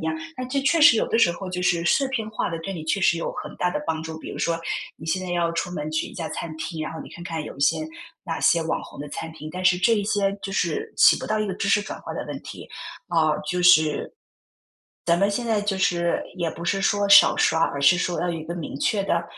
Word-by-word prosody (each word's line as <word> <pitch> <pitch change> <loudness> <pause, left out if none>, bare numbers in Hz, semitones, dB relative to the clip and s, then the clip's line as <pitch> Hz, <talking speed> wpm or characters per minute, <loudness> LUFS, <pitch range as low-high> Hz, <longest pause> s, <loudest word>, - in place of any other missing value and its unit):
样， 330 - -1 0.2
那 255 - -4
这 275 +2 -1
确 330 +5 +2
实 295 -6 +8
有 - - +1
的 225 - +1
时 230 -7 +5
候 185 +2 -6
就 180 0 -3
是 175 -2 +1
视 270 +10 +2
频 225 -5 -3
化 215 - -2
的， 165 - -4
对 195 +4 -5
你 165 - -6
确 180 +5 0
实 190 - +3
有 - - -3
很 - - -7
大 180 - 0
的 150 - -2
帮 160 -1 -2
助。 160 0 -7
比 - - -8
如 - - -7
说 165 0 0 0.4
你 160 - -11
现 185 +3 -1
在 180 - -5
要 170 -1 0
出 170 +1 -2
门 150 -4 -4
去 160 +1 -1
一 - - -12
家 165 -3 -4
餐 160 -2 -5
厅， 160 0 -5
然 155 - -5
后 160 - -7
你 - - -9
看 175 - -10
看 165 -3 -4
有 - - -9
一 - - -11
些 140 - +3 0.5
哪 - - -4
些 170 - +4
网 160 - -2
红 - - -12
的 145 - -6
餐 160 - -6
厅， 155 -1 -8
但 185 0 -5
是 180 0 +4
这 210 +5 +3
一 205 - 0
些， 200 -1 0
就 195 - -5
是 435 - -1
起 - - +7
不 - - -6
到 215 - +1
一 215 - 0
个 190 - -3
知 200 - -2
识 205 - +4
转 205 - -7
化 - - -6
的 - - -4
问 - - -6
题。 - - -10 0.4
啊， 165 -3 +2 0.2
就 180 0 -1
是 155 -4 +4 0.9
咱 170 0 +3
们 200 +1 +3
现 220 +4 -2
在 220 -3 +1
就 205 -1 -1
是， 170 -2 +1
也 175 -3 -1
不 170 +1 -8
是 195 +3 0
说 205 0 +1
少 200 - +7
刷， 160 - +2
而 140 - -4
是 140 +5 +5
说 175 -1 -1
要 175 - -1
有 - - -1
一 - - -7
个 170 +2 -6
明 165 -5 -6
确 200 +4 +1
的 170 -3 0
175 Hz, 305 characters per minute, -24 LUFS, 165-200 Hz, 0.9 s, 实